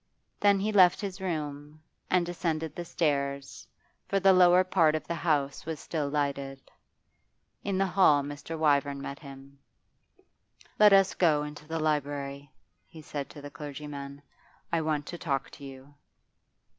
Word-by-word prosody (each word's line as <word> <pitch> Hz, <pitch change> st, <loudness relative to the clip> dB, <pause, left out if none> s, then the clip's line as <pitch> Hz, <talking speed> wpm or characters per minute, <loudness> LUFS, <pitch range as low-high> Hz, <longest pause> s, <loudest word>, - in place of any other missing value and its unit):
Then 200 Hz, -1 st, +4 dB
he 210 Hz, +3 st, -1 dB
left 185 Hz, -4 st, +6 dB
his 195 Hz, -1 st, -5 dB
room, 150 Hz, -4 st, -4 dB, 0.3 s
and 180 Hz, -1 st, +2 dB
descended 165 Hz, -2 st, -3 dB
the 175 Hz, -, -4 dB
stairs, 140 Hz, -4 st, -2 dB, 0.4 s
for 195 Hz, -, +1 dB
the 195 Hz, 0 st, +5 dB
lower 180 Hz, 0 st, +6 dB
part 165 Hz, -4 st, +3 dB
of 155 Hz, -, -4 dB
the -, -, -3 dB
house 145 Hz, -5 st, -1 dB
was 160 Hz, -2 st, -4 dB
still 150 Hz, -4 st, -3 dB
lighted. 140 Hz, -2 st, -3 dB, 0.9 s
In 200 Hz, -2 st, -1 dB
the 195 Hz, -, +2 dB
hall 175 Hz, -6 st, +4 dB
Mr. 145 Hz, +3 st, -6 dB
Wyvern 145 Hz, -2 st, +2 dB
met 140 Hz, 0 st, -6 dB
him. 135 Hz, -1 st, -13 dB, 1.2 s
'Let 210 Hz, -1 st, +8 dB
us 195 Hz, -1 st, +5 dB
go 155 Hz, -5 st, +2 dB
into 150 Hz, 0 st, -9 dB
the 165 Hz, +1 st, -3 dB
library,' 145 Hz, -2 st, -2 dB, 0.4 s
he 160 Hz, -2 st, -13 dB
said 145 Hz, -2 st, -5 dB
to 145 Hz, -, -12 dB
the 145 Hz, -, -8 dB
clergyman. 145 Hz, -1 st, -8 dB, 0.5 s
'I 165 Hz, -, +2 dB
want 155 Hz, -2 st, -1 dB
to 175 Hz, +1 st, -7 dB
talk 135 Hz, -5 st, -2 dB
to 145 Hz, -, -13 dB
you. 135 Hz, +1 st, -11 dB
150 Hz, 155 wpm, -28 LUFS, 140-175 Hz, 1.2 s, Let